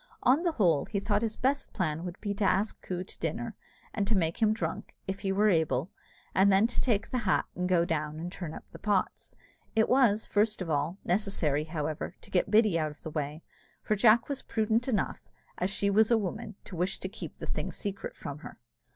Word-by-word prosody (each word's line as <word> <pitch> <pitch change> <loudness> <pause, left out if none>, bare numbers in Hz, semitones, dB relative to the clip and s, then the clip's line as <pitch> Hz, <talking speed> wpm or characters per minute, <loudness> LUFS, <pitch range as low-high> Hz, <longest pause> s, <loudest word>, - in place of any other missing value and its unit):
On 265 +6 +5
the 345 -2 +1
whole, 170 - +3
he 200 - -2
thought 205 +1 +1
his 225 -1 -2
best 270 +2 0
plan 165 -4 -1
would 180 0 -6
be 205 - -2
to 205 +1 -2
ask 195 +2 +1
Coo 180 -1 -3
to - - -13
dinner, - - -3 0.4
and 205 -2 -1
to 215 -1 +2
make 165 +3 0
him 215 -1 +5
drunk, 220 - -3
if 195 0 -3
he 195 - -1
was 205 +1 +4
able, 160 -1 +1 0.4
and 195 +1 +5
then 195 +3 +5
to 235 - 0
take 225 -4 0
the 255 - +1
hat 205 -5 +2
and 180 +1 -2
go 175 -2 +4
down 155 -2 -2
and 175 +2 -5
turn 175 -4 -6
up - - -9
the - - -11
pots. 205 -3 -1 0.4
It 220 0 +4
was, 235 -5 +4
first 210 +1 +2
of 180 -4 -3
all, 150 +5 0
necessary, 175 -6 +1
however, 155 -1 -3
to - - -16
get 185 +1 +2
Biddy 210 -5 +4
out 155 -1 0
of 150 - -14
the 160 - -5
way; 150 +1 -3 0.4
for 215 - +1
Jack 220 +2 +5
was 280 -2 -3
prudent 225 +2 0
enough, 220 -7 -1 0.3
as 180 - +1
she 200 +1 0
was 215 +2 +5
a 235 - +5
woman, 210 +1 -4
to 185 - -9
wish 180 +3 -1
to - - -3
keep 190 - -8
the - - -6
thing - - -3
secret 200 +1 -5
from 145 0 -6
her. - - -10
195 Hz, 225 wpm, -30 LUFS, 170-215 Hz, 0.4 s, On